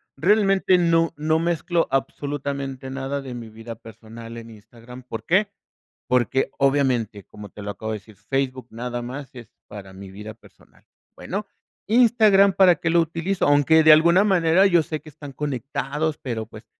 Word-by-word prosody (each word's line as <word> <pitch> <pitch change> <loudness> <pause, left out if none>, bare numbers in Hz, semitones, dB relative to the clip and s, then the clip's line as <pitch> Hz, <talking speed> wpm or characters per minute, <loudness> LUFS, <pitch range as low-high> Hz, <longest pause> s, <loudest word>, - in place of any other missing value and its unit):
Realmente 195 0 +3
no 165 -1 +2
no 155 +1 +1
mezclo 170 0 0
absolutamente 135 -1 -4
nada 135 +1 -4
de 130 -2 -7
mi 120 -2 -8
vida 115 +1 -9
personal 115 +1 -12
en 115 0 -10
Instagram, 115 +3 -14
¿por 120 -3 -8
qué? 195 +5 +2 0.6
Porque, 125 +1 +1
obviamente, 130 -7 0
como 105 -1 -12
te 105 - -12
lo 105 0 -5
acabo 110 +2 -6
de 110 - -4
decir, 105 +1 -19
Facebook 130 +4 -3
nada 120 +1 -5
más 135 +3 -7
es 120 -4 -12 0.2
para 100 -2 -10
mi 95 0 -11
vida 105 +3 -9
personal, 110 - -23 0.3
bueno, 205 +3 -5 0.4
Instagram, 215 -4 +4
¿para 185 -3 +5
qué 170 - -2
lo 170 +1 +3
utilizo? 170 +4 -1
Aunque 145 +2 +4
de 155 0 +7
alguna 170 +5 +5
manera 185 -2 +3
yo 175 -4 +4
sé 155 0 -5
que 155 - -13
están 145 -1 -11
conectados, 145 +2 -3
pero 115 -4 -5
pues, 110 +1 -13
140 Hz, 170 wpm, -22 LUFS, 115-165 Hz, 0.6 s, de